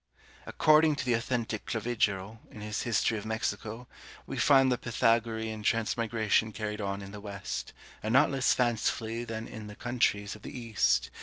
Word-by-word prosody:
According 155 0 +4
to 130 - -4
the 125 - +2
authentic 115 -2 -2
Clavigero, 110 -3 -1
in 105 - -11
his 105 0 -3
history 115 -1 +1
of 105 - -10
Mexico, 110 +2 -3 0.4
we - - -6
find 135 -2 +5
the 125 - +2
Pythagorean 115 -2 0
transmigration 115 -1 +1
carried 105 0 -4
on 100 0 -3
in 95 - -9
the 105 0 -9
West, 100 -2 -5 0.3
and 110 - -2
not 135 +5 +5
less 135 -2 +2
fancifully 115 -1 0
than 115 0 -5
in 110 -3 -8
the 105 - -9
countries 105 -4 0
of 105 - -14
the - - -8
East. 115 -3 +1
110 Hz, 165 wpm, -30 LUFS, 105-120 Hz, 0.4 s, find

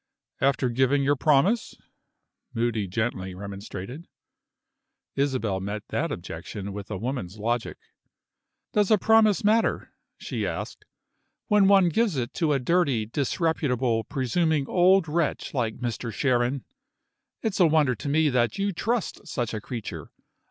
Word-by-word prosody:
"After 135 -1 +2
giving 130 +3 +2
your 145 +1 +3
promise?" 155 - +2 0.8
Moody 115 -3 0
gently 95 -2 -2
remonstrated. 100 - -7 1.1
Isabel 130 -8 0
met 100 +2 -4
that - - -1
objection 100 -1 -6
with 100 0 -7
a 105 - -3
woman's 110 -4 -4
logic. 115 +2 -2 1.0
"Does 210 -2 +2
a 215 - +6
promise 220 0 +4
matter?" 220 +2 +1 0.2
she - - -4
asked, - - -5 0.6
"when 210 -2 +5
one 195 -3 +6
gives 210 +1 +1
it 120 0 -2
to 160 -3 0
a 140 - +3
dirty, 135 -5 +1
disreputable, 130 -3 0
presuming 145 +3 0
old 185 0 +4
wretch 155 +1 -1
like 115 -5 -1
Mr. 120 -1 -4
Sharon? 125 +3 0 0.8
It's 215 -4 -1
a 175 - +6
wonder 150 -4 +3
to 135 +5 -5
me 155 +1 +3
that 125 - +1
you 200 0 0
trust 225 +5 -2
such 120 -4 -3
a 110 - -3
creature. 115 -1 -6
135 Hz, 135 wpm, -26 LUFS, 115-170 Hz, 1.1 s, a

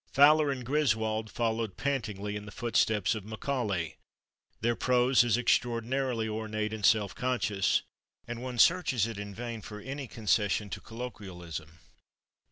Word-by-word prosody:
Fowler 150 +2 +6
and 130 -3 -3
Griswold 110 -6 +1
followed 115 -3 -1
pantingly 105 -7 -2
in 105 0 -6
the - - -8
footsteps 110 -2 +1
of 110 -3 -5
Macaulay; 105 - -2 0.6
their 120 +1 +1
prose 125 +1 +4
is 120 -1 +2
extraordinarily 120 0 +1
ornate 110 0 -3
and 110 -2 -6
self 105 -2 +4
conscious, 120 -7 +1 0.4
and 120 0 -5
one 125 -1 -5
searches 135 - +4
it 115 -3 -5
in 100 -1 -6
vain 115 -2 -5
for 105 +1 -8
any 135 +4 -6
concession 105 -2 0
to - - -5
colloquialism. 90 -9 -8
115 Hz, 140 wpm, -30 LUFS, 105-125 Hz, 0.6 s, Fowler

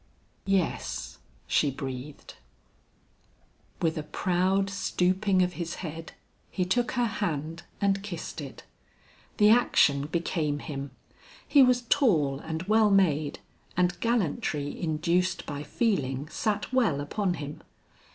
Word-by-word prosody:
"Yes," 195 -3 -1 0.3
she 145 - +2
breathed. 135 +1 -7 1.5
With 160 -1 +1
a - - -2
proud 185 +5 +1
stooping 190 0 +1
of 180 0 -1
his 170 -1 -4
head, 160 +1 -7 0.4
he 185 - -1
took 240 +6 0
her 245 -2 +2
hand 170 -7 -3 0.2
and 195 -1 +1
kissed 175 -5 -6
it. 140 -2 -9 0.7
The 210 0 +6
action 145 -11 +4
became 160 -2 -1
him; 140 -1 -6 0.6
he 285 - +6
was 250 -1 +4
tall 165 - +2
and 160 +2 -4
well 215 +2 +4
made, 155 -7 +2 0.4
and 180 0 +1
gallantry 160 -10 -1
induced 170 +3 0
by 145 -1 -5
feeling, 145 - -1
sat 210 +5 -2
well 225 - +2
upon 180 +6 -1
him. 145 -2 -7
175 Hz, 120 wpm, -28 LUFS, 150-200 Hz, 1.5 s, The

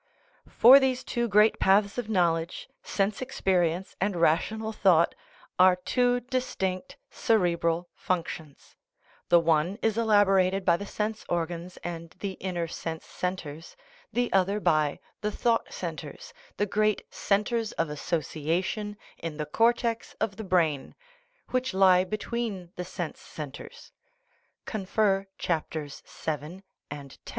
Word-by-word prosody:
For 260 +4 +8
these 260 -2 0
two 240 -1 -1
great 210 +1 +4
paths 200 +3 +3
of 230 -3 -4
knowledge, 170 -4 0
sense 200 +2 -1
experience 185 -8 0
and 195 0 +1
rational 220 +7 +1
thought, 180 -5 +4 0.5
are 185 0 +7
two 245 +6 +1
distinct 255 -1 -3
cerebral 175 -5 +1
functions; 165 -4 -4 0.5
the 175 - +7
one 165 +3 +2
is 225 0 +1
elaborated 195 -3 +3
by 170 - +5
the 200 - -7
sense 215 +2 -3
organs 175 +1 -3
and 170 -1 -6
the 200 - -3
inner 175 -3 -2
sense 160 0 -6
centres, 165 -3 -5 0.3
the 245 +1 0
other 195 +2 +2
by 155 -6 +2 0.2
the 210 - -1
thought 230 +1 0
centres, 480 - -7 0.2
the 205 - +2
great 215 0 +1
"centres 215 +2 0
of 165 -2 -1
association 170 +7 -2 0.2
in 165 -2 -5
the 150 - -2
cortex 230 +5 +1
of 195 - -1
the 220 - -6
brain/' 165 -7 +1 0.6
which 255 -5 -1
lie 185 -1 +6
be 215 +3 -3
tween 210 -6 -4
the 180 - -4
sense 175 -2 -5
centres. 145 -3 -9 0.7
(Cf. 195 -1 0
cc. 155 -1 -3
vii. 190 +2 -12 0.3
and 145 -2 -8 0.2
x.) - - -6
190 Hz, 130 wpm, -28 LUFS, 170-215 Hz, 0.7 s, For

